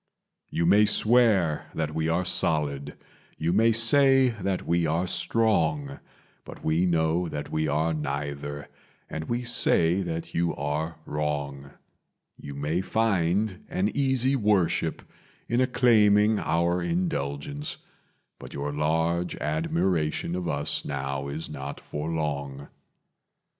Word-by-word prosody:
"You 85 Hz, -, -1 dB
may 105 Hz, +4 st, +5 dB
swear 105 Hz, -11 st, +3 dB
that 75 Hz, -1 st, -2 dB
we 80 Hz, +1 st, -1 dB
are 90 Hz, +3 st, 0 dB
solid, 75 Hz, -4 st, +1 dB, 0.4 s
you 85 Hz, +2 st, 0 dB
may 115 Hz, +4 st, +4 dB
say 135 Hz, +3 st, +5 dB
that 100 Hz, -5 st, -3 dB
we 85 Hz, -1 st, +1 dB
are 85 Hz, +4 st, 0 dB
strong, 115 Hz, +9 st, 0 dB, 0.4 s
But -, -, -12 dB
we 80 Hz, +4 st, +2 dB
know 85 Hz, +1 st, +1 dB
that 75 Hz, -2 st, -6 dB
we 80 Hz, 0 st, 0 dB
are 80 Hz, +3 st, +1 dB
neither 70 Hz, -1 st, -4 dB, 0.4 s
and 80 Hz, 0 st, -4 dB
we 120 Hz, +5 st, -2 dB
say 90 Hz, -6 st, +3 dB
that 85 Hz, -2 st, -5 dB
you 85 Hz, 0 st, 0 dB
are 75 Hz, +3 st, -3 dB
wrong; 70 Hz, -2 st, -3 dB, 0.6 s
You 70 Hz, -1 st, -9 dB
may 75 Hz, +5 st, -1 dB
find 100 Hz, -2 st, 0 dB
an 100 Hz, +3 st, 0 dB
easy 130 Hz, -1 st, +1 dB
worship 105 Hz, -7 st, +1 dB, 0.4 s
in 120 Hz, +2 st, +1 dB
acclaiming 110 Hz, -4 st, +4 dB
our 85 Hz, +2 st, 0 dB
indulgence, 75 Hz, -5 st, -3 dB, 0.6 s
But -, -, -10 dB
your 70 Hz, +1 st, -3 dB
large 80 Hz, +3 st, 0 dB
admiration 80 Hz, +1 st, -1 dB
of 90 Hz, -1 st, -3 dB
us 70 Hz, -2 st, -1 dB
now 70 Hz, 0 st, -3 dB
is 75 Hz, +3 st, -5 dB
not 70 Hz, -1 st, -7 dB
for 75 Hz, +2 st, -5 dB
long. 70 Hz, -3 st, -3 dB
85 Hz, 125 wpm, -26 LUFS, 75-100 Hz, 0.6 s, may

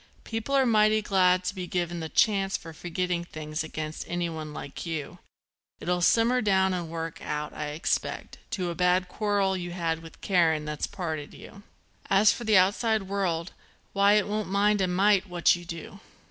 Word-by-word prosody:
People 225 Hz, +5 st, -3 dB
are 270 Hz, -1 st, +4 dB
mighty 215 Hz, -2 st, +4 dB
glad 185 Hz, -2 st, +3 dB
to 180 Hz, +2 st, -2 dB
be 185 Hz, -2 st, -5 dB
given 175 Hz, -1 st, -2 dB
the 160 Hz, -1 st, -5 dB
chance 195 Hz, -1 st, +2 dB
for 165 Hz, -1 st, -11 dB
forgetting 175 Hz, +1 st, -2 dB
things 155 Hz, -2 st, -5 dB
against 155 Hz, 0 st, -5 dB
anyone 165 Hz, -3 st, -3 dB
like 145 Hz, -1 st, -7 dB
you. 160 Hz, -4 st, -5 dB, 0.6 s
It'll 180 Hz, 0 st, -1 dB
simmer 235 Hz, +6 st, +3 dB
down 190 Hz, -2 st, +2 dB
and 175 Hz, -3 st, -3 dB
work 165 Hz, 0 st, -5 dB
out, 150 Hz, 0 st, -4 dB
I 150 Hz, -, -4 dB
expect, 150 Hz, +4 st, -3 dB
to 185 Hz, -6 st, -2 dB
a -, -, -3 dB
bad 180 Hz, +1 st, +2 dB
quarrel 200 Hz, -1 st, 0 dB
you 175 Hz, -1 st, -5 dB
had 165 Hz, -2 st, -2 dB
with 165 Hz, -1 st, -13 dB
Karen 165 Hz, -5 st, +2 dB
that's 150 Hz, -1 st, -3 dB
parted 160 Hz, -6 st, -5 dB
you. -, -, -12 dB
And 200 Hz, -, -15 dB, 0.5 s
as 200 Hz, +1 st, +6 dB
for 240 Hz, -, -5 dB
the 215 Hz, -2 st, +5 dB
outside 215 Hz, +3 st, +2 dB
world, 185 Hz, -3 st, -2 dB, 0.4 s
why 200 Hz, +1 st, +5 dB
it 210 Hz, -1 st, +3 dB
won't 210 Hz, -1 st, -2 dB
mind 205 Hz, +1 st, +2 dB
a 185 Hz, -, +2 dB
mite 195 Hz, +2 st, +3 dB
what 175 Hz, 0 st, +3 dB
you 175 Hz, 0 st, -9 dB
do. 170 Hz, +3 st, -8 dB
180 Hz, 185 wpm, -27 LUFS, 165-200 Hz, 0.6 s, as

